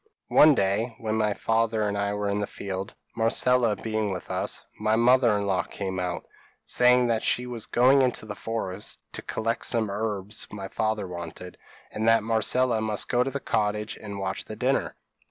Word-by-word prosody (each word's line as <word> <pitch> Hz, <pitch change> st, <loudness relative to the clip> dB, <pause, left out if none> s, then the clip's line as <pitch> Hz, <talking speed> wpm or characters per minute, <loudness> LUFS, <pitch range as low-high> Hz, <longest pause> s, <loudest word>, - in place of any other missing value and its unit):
p> -, -, -10 dB
"One 150 Hz, -1 st, +8 dB
day, 105 Hz, +4 st, 0 dB
when 110 Hz, -1 st, -3 dB
my 105 Hz, -2 st, +1 dB
father 115 Hz, -1 st, +1 dB
and 100 Hz, -1 st, -1 dB
I 100 Hz, 0 st, -1 dB
were 105 Hz, 0 st, -2 dB
in 100 Hz, +1 st, 0 dB
the 105 Hz, -, -2 dB
field, 95 Hz, +1 st, -6 dB, 0.2 s
Marcella 115 Hz, 0 st, +3 dB
being 110 Hz, -2 st, -2 dB
with 90 Hz, -, -6 dB
us, -, -, -2 dB
my 110 Hz, +1 st, +2 dB
mother 120 Hz, -1 st, +4 dB
in 100 Hz, -, -2 dB
law 95 Hz, -2 st, +1 dB
came 95 Hz, -2 st, -5 dB
out, 90 Hz, -1 st, -3 dB, 0.4 s
saying 125 Hz, 0 st, +4 dB
that 115 Hz, -1 st, +1 dB
she 125 Hz, -, 0 dB
was 120 Hz, -3 st, -5 dB
going 130 Hz, +3 st, +5 dB
into 125 Hz, -4 st, 0 dB
the 105 Hz, -, -5 dB
forest 105 Hz, -2 st, -5 dB, 0.2 s
to -, -, -5 dB
collect 115 Hz, +1 st, -2 dB
some 110 Hz, -4 st, 0 dB
herbs 105 Hz, -1 st, -3 dB
my 100 Hz, -2 st, -6 dB
father 110 Hz, -2 st, -1 dB
wanted, 85 Hz, 0 st, -8 dB, 0.4 s
and 110 Hz, +1 st, -2 dB
that 115 Hz, -1 st, +5 dB
Marcella 115 Hz, +1 st, +2 dB
must 110 Hz, -2 st, 0 dB
go 125 Hz, -, +2 dB
to 135 Hz, -, -2 dB
the 140 Hz, +1 st, -4 dB
cottage 105 Hz, -2 st, -1 dB
and 100 Hz, -2 st, -8 dB
watch 95 Hz, -1 st, -3 dB
the -, -, -7 dB
dinner. -, -, 0 dB
110 Hz, 190 wpm, -26 LUFS, 100-115 Hz, 0.4 s, One